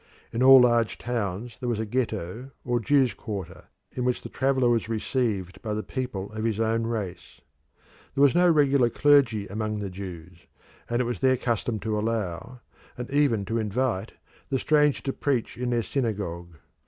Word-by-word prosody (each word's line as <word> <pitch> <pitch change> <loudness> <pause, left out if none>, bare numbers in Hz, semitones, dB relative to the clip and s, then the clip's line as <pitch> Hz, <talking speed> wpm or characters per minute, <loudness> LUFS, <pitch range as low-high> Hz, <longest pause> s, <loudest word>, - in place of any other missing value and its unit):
In 115 - -1
all 135 0 +9
large 120 -2 +3
towns 115 -1 -3
there 125 - -3
was 115 -3 -1
a 110 - -1
Ghetto 115 0 -3 0.2
or 120 -1 +1
Jews' 135 0 +3
quarter, 100 -7 -7 0.3
in 125 - -3
which 125 0 0
the - - -7
traveller 130 -1 +1
was 115 -2 +1
received 110 -5 -2
by 105 -2 -3
the 110 - -3
people 125 -7 -4
of 110 0 -5
his 110 -2 -1
own 115 0 +1
race. 105 -6 -5 0.8
There 140 - +4
was 140 - +6
no 175 +1 +4
regular 140 -6 +4
clergy 135 -8 +3
among 105 +1 -3
the 100 -2 -4
Jews, 90 -2 -9 0.4
and 120 +1 +1
it - - -4
was 120 -5 -3
their 130 -1 +3
custom 115 -2 -1
to 110 -1 -1
allow, 115 +2 -3 0.4
and 125 +1 -6
even 140 -8 +2
to 115 +4 -1
invite, 110 -1 -1 0.4
the 135 - +1
stranger 150 +1 +2
to 135 - -2
preach 135 -5 -1
in 125 0 -3
their 120 -1 +1
synagogue. 100 - -3
115 Hz, 180 wpm, -26 LUFS, 105-130 Hz, 0.8 s, all